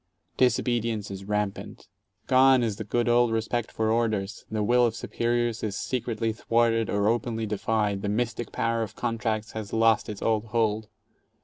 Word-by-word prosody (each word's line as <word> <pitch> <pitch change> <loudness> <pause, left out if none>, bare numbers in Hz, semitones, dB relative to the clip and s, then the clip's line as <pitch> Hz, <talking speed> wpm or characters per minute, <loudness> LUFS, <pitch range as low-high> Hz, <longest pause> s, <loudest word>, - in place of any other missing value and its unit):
Disobedience 115 -4 +1
is 95 0 -7
rampant. 105 -1 -3 0.4
11 130 0 +5
^one - - +1
is 110 -3 -1
the - - -4
good 120 +3 0
old 120 0 +4
respect 115 +1 -1
for 110 0 0
orders, 110 -3 -1
the 110 -1 -1
will 125 +4 +4
of 115 - -4
superiors 120 -1 -1
is 105 -2 -3
secretly 115 -3 -2
thwarted 115 0 +1
or 100 0 +1
openly 115 0 0
defied, 105 -1 -1
the 100 - -2
mystic 115 +1 -2
power 115 0 0
of 110 -3 -5
contracts 110 -2 -2
has 110 -3 -6
lost 115 -1 +3
its 105 -2 -6
old 110 -1 +1
hold. 110 -1 0
110 Hz, 170 wpm, -26 LUFS, 105-120 Hz, 0.4 s, 11